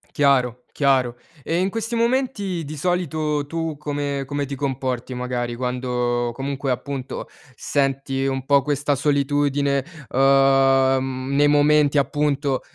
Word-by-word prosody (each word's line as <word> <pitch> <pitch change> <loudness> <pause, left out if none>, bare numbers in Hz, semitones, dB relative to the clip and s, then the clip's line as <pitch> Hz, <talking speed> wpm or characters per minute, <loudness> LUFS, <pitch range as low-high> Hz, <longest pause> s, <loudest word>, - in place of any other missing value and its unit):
Chiaro, 125 -4 +2
chiaro. 130 -4 +1 0.3
E 165 - -1
in 185 +2 +1
questi 225 +3 -4
momenti 230 -7 0
di 150 +1 -7
solito 155 -3 -1
tu 165 0 -3
come 145 -1 -3
come 145 +1 -2
ti 140 0 -5
comporti 130 -2 -3
magari 125 -1 -3
quando, 125 -1 -1
comunque, 135 +1 -3
appunto 135 +1 -4 0.3
senti 135 0 -1
un 135 -1 -2
po' 140 0 +4
questa 145 +1 0
solitudine, 140 -1 +1 0.3
ehm, 135 -1 +3
nei 145 +1 +4
momenti 150 0 +4
appunto 140 -1 0
140 Hz, 120 wpm, -22 LUFS, 130-145 Hz, 0.3 s, po